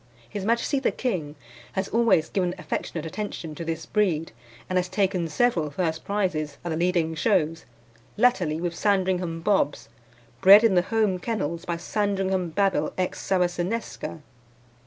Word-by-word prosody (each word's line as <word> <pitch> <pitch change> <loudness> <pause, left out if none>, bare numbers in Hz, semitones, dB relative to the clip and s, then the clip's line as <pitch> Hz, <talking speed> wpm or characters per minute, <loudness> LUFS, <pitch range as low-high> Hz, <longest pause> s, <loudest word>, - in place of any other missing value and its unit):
His 195 - -5
Majesty 235 +5 +1
the 265 - +1
King 165 - -3 0.4
has 190 0 -1
always 220 -9 +3
given 180 -2 -1
affectionate 165 -3 -4
attention 165 -2 -5
to 160 - -6
this 165 0 -4
breed, 175 -7 0 0.4
and 185 0 +1
has 180 0 -2
taken 190 -4 0
several 165 -2 +1
first 160 +1 -2
prizes 180 -8 -1
at - - -2
the 160 - -1
leading 170 -1 +1
shows, 165 -2 +1 0.5
latterly 190 -10 +2
with 175 0 -2
Sandringham 185 -4 0
Bobs, 180 - +1 0.5
bred 200 +3 +9
in 225 -4 +4
the 180 - +5
home 205 -1 0
kennels 175 -6 -3
by 170 -1 -2
Sandringham 190 -1 -1
Babil 190 -3 +1
ex 185 -1 -2
Saracenesca. 180 -1 -2
180 Hz, 145 wpm, -25 LUFS, 165-200 Hz, 0.5 s, bred